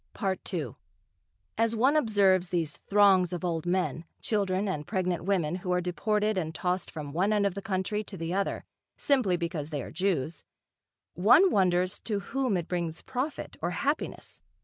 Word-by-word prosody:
II 195 -3 -2 0.9
As 230 0 +2
one 260 +6 +3
observes 200 - +3
these 165 -4 -1
throngs 195 -3 +4
of 180 0 -3
old 165 -1 -2
men, 180 -2 0 0.2
children 200 -2 0
and 150 -6 -3
pregnant 180 -3 -1
women 180 -4 +1
who 180 0 -4
are 180 - +3
deported 205 +4 0
and 160 -2 -4
tossed 180 +1 -1
from 150 -3 -6
one 190 +6 +2
end 205 -1 +2
of 200 - +1
the 200 - -5
country 205 +1 -1
to 195 - -8
the 165 +1 -3
other, 200 +1 -1 0.3
simply 245 -11 +2
because 165 -3 -3
they 145 -4 -3
are - - -8
Jews, 165 -3 -1 0.7
one 245 - +6
wonders 185 0 +2
to 210 -3 -2
whom 255 -1 -1
it 170 -1 -4
brings 170 -3 -3
profit 265 +3 -4
or 170 - 0
happiness. 285 - -2
185 Hz, 170 wpm, -28 LUFS, 175-210 Hz, 0.9 s, one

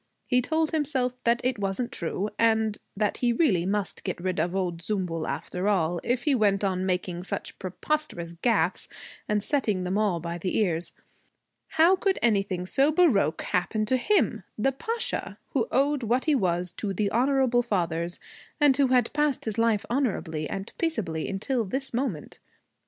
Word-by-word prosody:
He 250 -1 +3
told 315 +4 0
himself 275 -5 0
that 235 0 +3
it 250 -3 0
wasn't 200 +5 -1
true 190 +4 -2
and 220 -2 +2 0.2
that 210 -1 0
he 245 -1 +2
really 205 - +2
must 200 -1 -2
get - - -3
rid 185 +1 -2
of 175 +2 0
old 180 -3 -1
Zümbül 180 -5 -2
after 180 +2 -3
all, 175 -4 +1
if 245 0 0
he 295 - +3
went 205 -5 +2
on 190 -1 0
making 180 -1 -2
such - - -5
preposterous 185 - -2
gaffes 185 -2 +1 0.4
and 210 -1 +1
setting 215 -8 0
them 185 +3 0
all 200 -5 +1
by 170 +1 -5
the 185 +2 -1
ears. 175 -5 0 0.8
How 335 +4 +6
could 380 +1 0
anything 195 -5 +1
so 275 +10 +3
baroque 295 - +3
happen 200 +5 0
to 255 +4 +2
him, 275 - +2 0.2
the 270 +6 +2
Pasha, 455 - -3
who - - 0
owed 285 +1 +2
what 240 +3 0
he 310 - +3
was 180 -7 +1
to 200 -2 -2
the 200 +1 0
honorable 255 0 +3
fathers 175 -6 -1 0.4
and 290 -3 +5
who 275 0 +3
had 250 -2 +2
passed 295 -2 +1
his 220 0 -2
life 225 -3 +2
honorably 190 - -1
and 195 0 -5
peaceably 190 - -1
until 230 +5 -1
this 265 +7 -4
moment? 235 - -3
215 Hz, 170 wpm, -27 LUFS, 185-260 Hz, 0.8 s, How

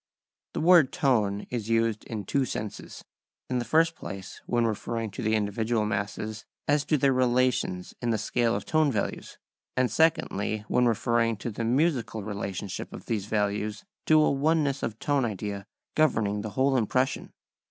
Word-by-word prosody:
The - - -2
word 165 -4 +6
tone 105 -7 +1
is 115 -3 -3
used 115 -1 +1
in 105 -4 -5
two 140 +7 +1
senses, 110 -4 -6 0.5
in 125 - +1
the - - -1
first 165 +3 +3
place 95 -8 -8
when 120 -1 +2
referring 115 0 -2
to 100 - -6
the 110 0 +1
individual 110 +2 0
masses 105 +1 -3 0.2
as 145 0 +3
to 155 - +2
their 135 0 +3
relations 125 -7 +1
in 120 - -1
the 115 - +2
scale 115 +2 +1
of - - -4
"tone 155 -2 +2
values"; - - -3 0.4
and 130 -3 +2
secondly 110 -7 +1
when 125 0 +3
referring 115 0 +1
to 115 +4 -4
the 115 - -4
musical 120 -4 +1
relationship 100 -2 -5
of - - -9
these 105 -3 -2
values 105 0 -1 0.2
to 155 0 +6
a 155 - +4
oneness 145 -1 +1
of 110 -2 -3
tone 145 +2 +1
idea 100 -2 -4 0.3
governing 110 -9 +2
the 110 - -4
whole 135 +1 +3
impression. 130 +3 0
115 Hz, 165 wpm, -27 LUFS, 105-130 Hz, 0.5 s, word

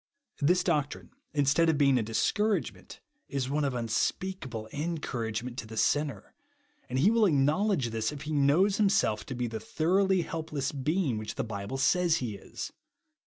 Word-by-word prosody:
This 180 +5 +3
doctrine, 145 -4 -1 0.2
instead 150 +3 +3
of 160 - +2
being 140 -3 +4
a - - +1
dis 110 +1 +1
couragement, 215 0 -2 0.3
is 135 -1 -2
one 150 +1 +1
of 135 -3 -1
unspeakable 120 - -2
en 165 +3 -2
couragement 120 -3 -4
to 120 - -5
the 110 0 -9
sinner; 145 +4 0 0.6
and 130 - -2
he 175 +11 +4
will 230 -2 +4
acknowledge 150 - +2
.this, 110 0 -1
if 150 -1 -7
he 155 - -5
know^s 155 +8 +3
himself 195 - +2
to 130 - -5
be 125 0 -1
the 115 -1 -4
thorough^ 185 - +1
helpless 155 -4 -3
being 145 - 0
which 110 0 -6
the 135 - -1
Bible 105 +2 -5
says 170 +4 +3
he 125 -8 -2
is. 100 - -7
140 Hz, 170 wpm, -29 LUFS, 120-170 Hz, 0.6 s, being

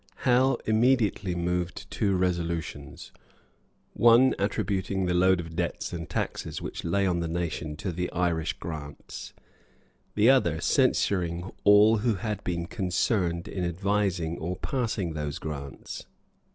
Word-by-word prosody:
Howe 130 +2 +4
immediately 110 -5 +2
moved 90 0 -2
two 100 -2 +1
resolutions; 85 -5 -3 0.8
one 120 +3 +6
attributing 95 -1 -1
the 90 - 0
load 90 +1 +4
of 80 -1 -7
debts - - -2
and 85 -1 -5
taxes - - -3
which - - -6
lay 100 +4 +1
on 90 -2 +1
the 85 - -2
nation 80 -2 -3
to 90 +4 -4
the 90 +1 -3
Irish 85 -3 0
grants; 75 -3 -8 0.8
the 105 +2 +4
other 105 - +4
censuring 90 -1 +1
all 105 +2 +7
who 110 +1 +1
had 105 +1 -4
been 85 -1 -2
concerned 90 -1 0
in 95 -2 -3
advising 90 -2 -1
or 85 +3 -3
passing 110 - -2
those 75 -1 -3
grants. 70 -3 -7
90 Hz, 130 wpm, -27 LUFS, 85-105 Hz, 0.8 s, all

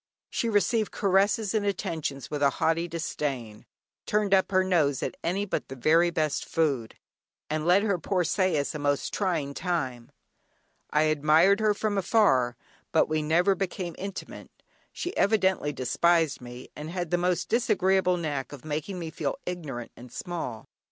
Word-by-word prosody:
She 230 - -1
received 210 +1 +1
caresses 200 +2 +2
and 215 -2 +1
attentions 155 -9 -3
with 145 -1 -3
a 140 - +5
haughty 165 +1 +1
disdain, 140 -9 -4 0.4
turned 210 -1 +1
up 190 -1 +4
her 185 -1 +4
nose 155 -8 +1
at - - -3
any 195 +4 0
but 200 - -3
the 135 - -7
very 165 +6 +4
best 155 -3 -1
food, 140 -8 -1 0.6
and 155 +1 -1
led 185 +3 +5
her 200 -4 +1
poor 185 +1 0
sais 170 -4 +1
a 150 - -5
most 145 -1 0
trying 165 -8 -1
time. 135 -9 -3 0.8
I 150 +1 +3
admired 155 +6 +4
her 215 -1 +2
from 205 -1 0
afar, 135 - +3 0.3
but - - +3
we 155 0 +1
never 170 +6 +3
became 185 -2 -3
intimate; 195 0 -7 0.4
she 355 +2 -5
evidently 190 -7 +2
despised 155 +5 +1
me, 125 +1 -10
and 150 +1 -6
had 175 -1 -4
the 175 - +2
most 180 0 0
disagreeable 190 -5 +2
knack 145 -6 -3
of 145 0 -10
making 155 +5 -3
me 165 -2 -5
feel - - -3
ignorant 145 -10 -5
and 125 0 -12
small. 170 -10 -5
170 Hz, 160 wpm, -27 LUFS, 145-190 Hz, 0.8 s, a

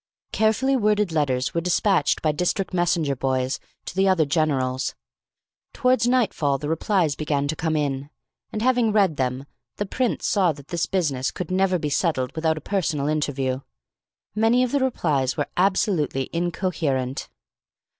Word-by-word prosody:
Carefully 220 +5 +2
worded 210 -5 +2
letters 135 -5 0
were 170 - 0
despatched 180 +2 +1
by 155 - +3
District 180 +5 -1
Messenger 170 -5 +1
boys 130 0 -1 0.3
to - - -7
the 195 +1 +3
other 185 -5 +3
generals. 140 -4 0 0.8
Towards 250 -2 +2
nightfall 200 - +1
the 145 - -5
replies 165 -1 +1
began 145 -2 -1
to 155 - -2
come 160 0 -1
in, 140 -2 -1 0.4
and, 215 - -3
having 245 -3 +3
read 195 -8 +2
them, 130 +1 -1 0.3
the 205 - -2
Prince 245 +4 -1
saw 185 -6 +2
that 140 -1 -15
this 170 -1 -1
business 145 -9 0
could 180 -1 -6
never 185 0 +2
be 150 -3 -3
settled 140 -4 0
without 160 0 +1
a - - -6
personal 160 -6 -1
interview. 140 -4 -1 0.7
Many 225 +4 +3
of 250 - -1
the 285 - +2
replies 155 - 0
were 145 - -1
absolutely 180 -8 +1
incoherent. 165 - -1
165 Hz, 155 wpm, -24 LUFS, 140-195 Hz, 0.8 s, by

